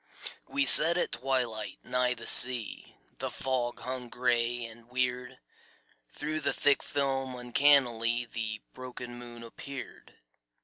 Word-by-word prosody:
We 280 0 -2
sat 170 -7 +9
at - - -3
twilight 120 -6 -4
nigh 125 0 -1
the 115 - -12
sea, 125 -3 +5 0.2
The - - -5
fog 125 -2 -5
hung 125 0 -7
gray 120 -1 -2
and 115 +1 -15
weird. 125 0 -4 0.7
Through 155 +1 -6
the - - -3
thick 145 -1 0
film 135 -2 -4
uncannily 120 -2 0
The 110 -2 -7
broken 125 -1 -10
moon 120 -1 -12
appeared. 135 +3 -12
125 Hz, 125 wpm, -27 LUFS, 120-135 Hz, 0.7 s, sat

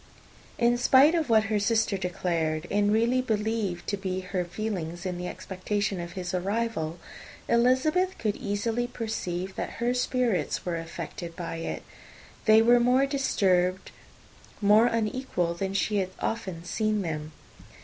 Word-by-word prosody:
In 240 0 +3
spite 270 +5 +6
of 325 -5 0
what 220 -1 +5
her 215 0 0
sister 220 0 +1
declared, 170 -4 -1
and 205 0 +2
really 235 +4 +3
believed 215 -6 -1
to 200 - -1
be 190 -1 -3
her 185 -1 -2
feelings, 175 -2 -4
in 180 -1 -3
the 180 - -4
expectation 200 +1 -3
of 170 0 -6
his 180 -1 -5
arrival, 185 -3 -1 0.5
Elizabeth 260 +10 +2
could 215 -2 -1
easily 230 +1 -1
perceive 190 -6 -4
that - - -3
her 240 +1 0
spirits 250 -4 0
were 175 -2 -1
affected 165 +1 -7
by 170 -2 -5
it. 165 - -4 0.6
They 220 0 +7
were 240 +1 +6
more 250 +3 +4
disturbed, 190 -10 +1 0.7
more 215 +3 +5
unequal, 220 -6 -1
than 195 +3 -3
she 210 +1 +1
had 190 -2 0
often 190 -7 -3
seen 215 +2 0
them. 155 -2 -4
205 Hz, 145 wpm, -27 LUFS, 180-235 Hz, 0.7 s, They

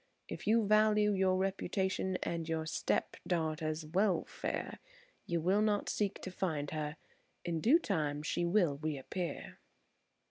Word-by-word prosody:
If - - -7
you 225 0 +4
value 210 0 +4
your 190 -1 +2
reputation 190 0 -1
and 165 -1 -3
your 160 -1 -1
step 160 - -1
daughter's 160 -2 -1
welfare, 180 +2 -1 0.5
you 170 -1 0
will 185 +6 +2
not 210 -1 +1
seek 205 -2 -1
to 185 - -5
find 155 -6 -2
her. 150 0 -3 0.5
In 165 -2 -1
due 270 - +6
time 150 - -1
she 165 - -1
will 170 -5 +2
reappear." 155 - -4
175 Hz, 135 wpm, -34 LUFS, 155-200 Hz, 0.5 s, due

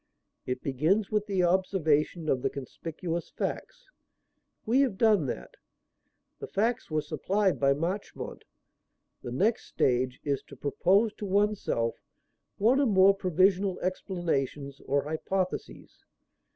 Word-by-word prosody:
It 125 0 -3
begins 165 - +1
with 210 -1 0
the 190 -3 +1
observation 170 -3 +1
of 130 -4 +1
the 135 - +1
conspicuous 165 +5 -5
facts. - - -5 0.8
We 240 +5 +3
have 250 -9 +1
done 210 - +4
that. 60 - -5 0.9
The - - -6
facts 230 +5 -1
were 155 -1 0
supplied 185 +6 0
by 140 0 +3
Marchmont. 180 +7 -4 0.8
The 120 - -6
next 205 - +1
stage 125 0 0
is 140 -2 -1
to 140 - -11
propose 190 - +2
to 205 - -5
oneself 195 - 0 0.6
one 235 +7 +4
or 280 - +3
more 195 -2 +6
provisional 190 0 +2
explanations 150 -7 -2
or 140 0 +1
hypotheses. 180 +5 -4
180 Hz, 125 wpm, -28 LUFS, 140-200 Hz, 0.9 s, more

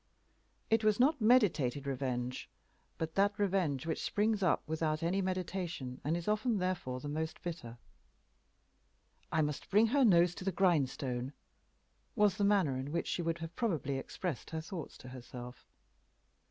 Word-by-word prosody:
It 225 0 +4
was 215 0 +3
not 285 +2 +3
meditated 175 - +3
revenge, 130 -2 -3 0.5
but 160 0 -3
that 200 +1 +2
revenge 180 -9 0
which 160 - -2
springs 210 0 +1
up 180 -4 +2
without 155 0 -1
any 185 +4 +1
meditation, 180 -8 -3
and 155 +4 0
is 170 - -6
often 215 +2 +1
therefore 180 -9 -2
the 145 - -7
most 155 +2 -3
bitter. 125 -9 -6 1.5
"I 160 -1 +2
must 150 -1 -3
bring 210 +3 +5
her 285 -1 +5
nose 175 -6 +5
to 185 - -8
the 195 - 0
grindstone," 140 -7 0 0.8
was 210 -4 +3
the 205 - 0
manner 195 -10 +3
in 135 +2 -5
which 170 +1 -1
she - - -1
would 165 0 -1
have 165 +1 -11
probably 145 - -1
expressed 165 +1 -5
her 160 -1 -3
thoughts 165 -1 -7
to 130 - -11
herself. 125 -1 -9
165 Hz, 155 wpm, -33 LUFS, 140-195 Hz, 1.5 s, bring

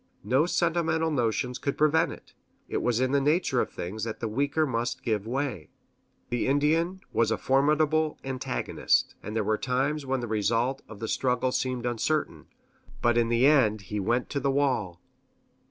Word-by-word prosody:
No 130 - +2
sentimental 160 -2 +1
notions 125 -1 -1
could 140 - -2
prevent 160 +2 +3
it. - - -12 0.3
It - - -2
was 120 -1 +1
in 130 0 +1
the 140 0 +3
nature 150 -3 +2
of - - -2
things 100 +5 -6
that 115 -1 -4
the 115 - -2
weaker 140 +7 0
must 120 -3 -2
give 110 -3 -1
way. 125 - -3 0.6
The 120 - 0
Indian 160 +7 +1
was 115 -2 +2
a 110 - 0
formidable 150 +3 +2
antagonist, 130 -1 0
and 105 - -6
there 110 - +1
were 110 +1 0
times 135 +4 0
when 135 0 -1
the 120 - -4
result 115 +5 0
of 105 -1 -11
the 110 - -3
struggle 125 +1 0
seemed 125 -1 -2
uncertain; 120 - -1 0.6
but 120 0 +3
in 120 -1 +2
the 120 +2 +3
end 120 -8 +4
he 105 - 0
went 120 +5 0
to 140 - -1
the 140 +1 0
wall. 130 -11 0
130 Hz, 175 wpm, -27 LUFS, 115-145 Hz, 0.6 s, end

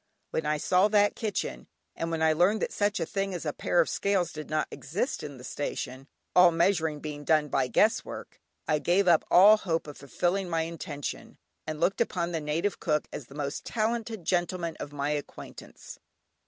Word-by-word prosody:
When 160 - -1
I 150 0 +1
saw 180 +6 +3
that 205 -1 +3
kitchen, 215 -2 -3 0.3
and 165 - -3
when 165 -1 -1
I 160 0 +4
learned 180 +7 +2
that - - -2
such 205 -1 0
a 165 - 0
thing 195 +1 -2
as 170 - -5
a 150 - -1
pair 175 - 0
of 165 - +4
scales 190 -4 0
did 155 -1 -7
not 155 0 0
exist 195 - -3
in 145 -2 -7
the 125 - -12
station, 135 -1 -5 0.3
all 180 -1 +8
measuring 165 -3 +1
being 150 -1 -6
done 150 0 +2
by 135 -2 +1
guess 215 - +3
work, - - -9 0.3
I 155 -1 +2
gave 180 +6 +2
up 170 -3 +5
all 205 +4 +8
hope 165 -5 -2
of 145 -1 -9
fulfilling 175 +7 -1
my 165 -1 0
intention, 160 -3 -6 0.3
and 155 -1 -4
looked 185 +6 +1
upon 175 -6 -1
the 165 -2 -2
native 160 +7 -1
cook 150 -3 0
as 130 - -7
the 140 - -14
most 145 -1 -4
talented 220 -3 -2
gentleman 175 -2 -1
of 145 - -6
my 145 0 -2
acquaintance. 145 -1 -8
165 Hz, 195 wpm, -28 LUFS, 150-190 Hz, 0.3 s, all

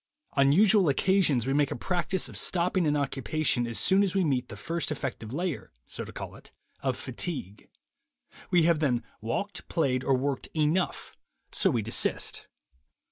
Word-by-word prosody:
On 140 0 +4
usual 195 +1 +5
occasions 155 - +2
we 135 - 0
make 145 -1 +2
a - - -3
practice 180 +6 -1
of - - -11
stopping 180 -1 +1
an 150 0 +2
occupation 135 -2 0
as 115 - -3
soon 190 +1 +4
as 195 -2 0
we 190 - +3
meet 130 -6 0
the - - -7
first 165 -1 -2
effective 115 -6 -4
layer 170 +1 -3
(so - - -5
to - - -9
call - - -7
it) - - -15 0.3
of 130 -2 -1
fatigue. 130 - -5 0.8
We 175 -2 +4
have 165 -1 +3
then 125 -6 +1 0.2
walked, 120 - -4
played, 130 -6 +1
or 135 -1 +2
worked 135 0 -2
'enough,' 160 +4 0 0.4
so - - +3
we 115 -3 0
desist. 115 - 0
150 Hz, 170 wpm, -28 LUFS, 130-175 Hz, 0.8 s, usual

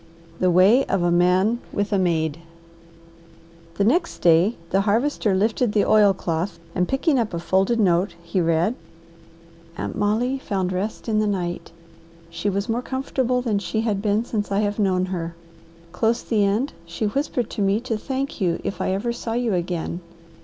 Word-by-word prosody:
"THE 185 - +3
WAY 190 +9 +5
OF 185 - 0
A 175 - +2
MAN 185 +6 +3
WITH 205 +1 -2
A 200 - +3
MAID" 160 -3 0 1.4
The 200 - +1
next 335 - +1
day 175 +6 +4 0.2
the 195 - +3
Harvester 220 0 +1
lifted 220 +3 +1
the 210 - +3
oilcloth, 190 -4 +2 0.2
and 180 0 0
picking 270 +1 +1
up 220 -6 -1
a - - -2
folded 190 +6 +1
note 180 -2 +2
he 170 +2 -1
read 170 +5 +2 1.0
"Aunt - - -4
Molly 235 +6 0
found 190 -7 -2
rest 200 +6 -4
in 215 -2 +1
the 215 - +1
night. 175 -5 -3 0.6
She 170 +5 -2
was 200 +1 -2
more 230 +2 -1
comfortable 255 -1 -1
than 215 -5 0
she 200 +3 -2
had 210 -3 -1
been 210 +2 +1
since 210 -4 -3
I 200 +1 +2
have 205 0 -1
known 185 -3 +2
her. 170 -3 -4 0.6
Close 225 +6 0
the 210 -3 +1
end 215 +8 0
she 170 +6 -3
whispered 245 0 -1
to - - -3
me 200 +2 +2
to 240 -2 -2
thank 265 +2 -4
you 175 -3 +1
if - - -4
I 185 - 0
ever 230 +5 -1
saw 230 -1 -4
you 240 -2 0
again. 175 -1 -2
205 Hz, 175 wpm, -23 LUFS, 180-230 Hz, 1.4 s, WAY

